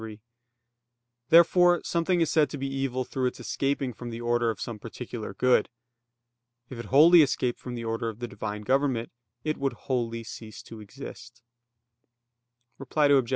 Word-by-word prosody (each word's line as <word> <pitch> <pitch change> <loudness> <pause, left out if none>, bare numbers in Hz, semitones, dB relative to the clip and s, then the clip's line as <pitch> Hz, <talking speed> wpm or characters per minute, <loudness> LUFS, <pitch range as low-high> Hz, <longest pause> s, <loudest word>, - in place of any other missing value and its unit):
3). 110 -1 -8 1.1
Therefore 175 +1 +6
something 170 +1 0
is 165 - +1
said 150 -2 +3
to 145 - -6
be 135 - -4
evil 135 -2 -2
through 130 0 -1
its 125 - -5
escaping 135 -2 -2
from 120 +1 -8
the 115 0 -6
order 120 0 +1
of 110 - -4
some 115 -3 -6
particular 115 -2 -7
good. 125 +4 +3 1.0
If 125 - -7
it 120 - -6
wholly 160 - +7
escaped 130 -4 0
from 125 -1 -7
the 115 - -5
order 115 0 -2
of 110 - -8
the 120 +1 -5
Divine 105 -2 -6
government, 130 -1 0 0.3
it 155 0 -1
would 135 -2 -1
wholly 115 -2 -3
cease 110 -1 -10
to 115 - -11
exist. 120 +1 -11 1.4
Reply 145 +2 +1
Obj. 135 -4 +3
125 Hz, 165 wpm, -27 LUFS, 115-140 Hz, 1.4 s, wholly